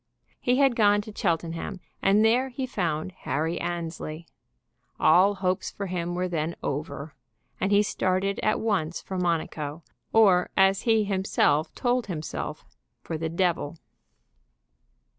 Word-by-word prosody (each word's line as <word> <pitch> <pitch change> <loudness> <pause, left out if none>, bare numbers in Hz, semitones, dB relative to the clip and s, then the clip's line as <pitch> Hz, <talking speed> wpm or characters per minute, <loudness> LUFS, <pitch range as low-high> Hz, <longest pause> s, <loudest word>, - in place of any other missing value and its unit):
He 250 - +2
had 270 -3 +4
gone 205 -2 +4
to 210 0 -10
Cheltenham, 170 +2 -2 0.2
and 205 +3 +4
there 250 +4 +3
he 260 +1 -3
found 175 -8 -2
Harry 160 +3 -1
Annesley. 165 -2 -4 0.7
All 190 +5 +5
hopes 185 -1 -1
for 200 - -5
him 175 -2 -3
were 180 +1 0
then 165 -1 -2
over 145 +1 -4 0.5
and 195 - 0
he 205 +1 +5
started 195 0 0
at 215 - +1
once 185 -7 0
for 190 -1 -5
Monaco; 160 -3 -2 0.3
or, 195 -5 +5
as 195 0 +4
he 220 -1 +4
himself 190 -6 +1
told 245 -2 0
himself, 160 -5 -5 0.4
for 165 - -4
the 160 +1 -2
devil. 170 -2 0
185 Hz, 135 wpm, -26 LUFS, 165-205 Hz, 0.7 s, All